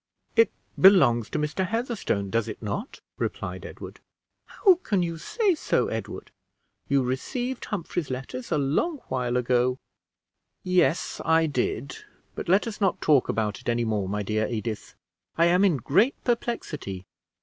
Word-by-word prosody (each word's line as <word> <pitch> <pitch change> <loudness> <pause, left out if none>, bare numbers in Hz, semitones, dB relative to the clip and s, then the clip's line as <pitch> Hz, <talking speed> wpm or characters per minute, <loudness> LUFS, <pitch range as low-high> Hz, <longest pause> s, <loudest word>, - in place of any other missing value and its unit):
"It 455 - +5 0.3
belongs 120 - +6
to - - -2
Mr. 150 +5 -1
Heatherstone, 220 - -2
does 115 0 +1
it 110 - -6
not?" 115 - -5 0.2
replied - - -4
Edward. - - -10 0.5
"How 370 -4 +4
can 200 - +1
you 165 -1 -3
say 420 - +1
so, 310 - 0
Edward! - - -6 0.6
You 140 -1 +2
received 245 - -3
Humphrey's 175 -5 -3
letters 130 0 -6
a 155 - +2
long 150 - 0
while 125 -1 0
ago." 125 +1 +2 0.9
"Yes, 180 -4 +1
I 160 0 +4
did; 135 -2 -2 0.4
but - - -6
let 190 +3 +4
us 220 -2 -6
not 195 -2 +2
talk 145 -5 +3
about 105 +2 -1
it 125 - -4
any 120 0 +1
more, 105 -4 -1
my 105 +1 -2
dear 110 +2 0
Edith. 115 -2 -4 0.4
I 165 - +5
am 180 +3 +4
in 185 -7 +4
great 195 - +2
perplexity." 155 - -3
145 Hz, 150 wpm, -26 LUFS, 120-195 Hz, 0.9 s, belongs